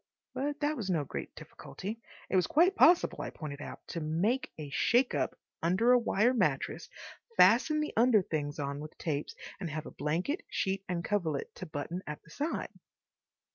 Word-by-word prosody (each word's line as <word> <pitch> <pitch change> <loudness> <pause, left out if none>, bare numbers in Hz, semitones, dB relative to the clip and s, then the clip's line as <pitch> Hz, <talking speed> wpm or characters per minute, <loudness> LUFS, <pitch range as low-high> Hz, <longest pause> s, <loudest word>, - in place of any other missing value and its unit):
But 285 +3 -2
that 295 +1 +1
was 210 -8 -4
no 165 -5 +1
great - - -6
difficulty. 215 +4 -8 0.3
It - - -1
was 185 - +4
quite 355 +5 +4
possible, 350 -2 +5
I - - -3
pointed 145 -2 -7
out, - - -9
to 170 - -3
make 175 +12 0
a 150 -3 -7
shake 245 - +3
up - - -1 0.2
under 185 +9 +3
a 250 - +7
wire 235 +1 +2
mattress, 245 - 0 0.5
fasten 255 +10 +5
the 300 - -3
under 225 -3 +5
things 145 -3 -3
on 140 0 -3
with 155 +1 -9
tapes, 150 -3 -3 0.2
and 180 -4 -3
have 155 0 -4
a - - -8
blanket, 175 - -1
sheet, 195 0 -1
and 170 -2 -2
coverlet 170 -9 -1
to - - -8
button 160 +3 -4
at 150 0 -6
the 165 - -18
side. 300 +3 -2
185 Hz, 180 wpm, -31 LUFS, 155-250 Hz, 0.5 s, a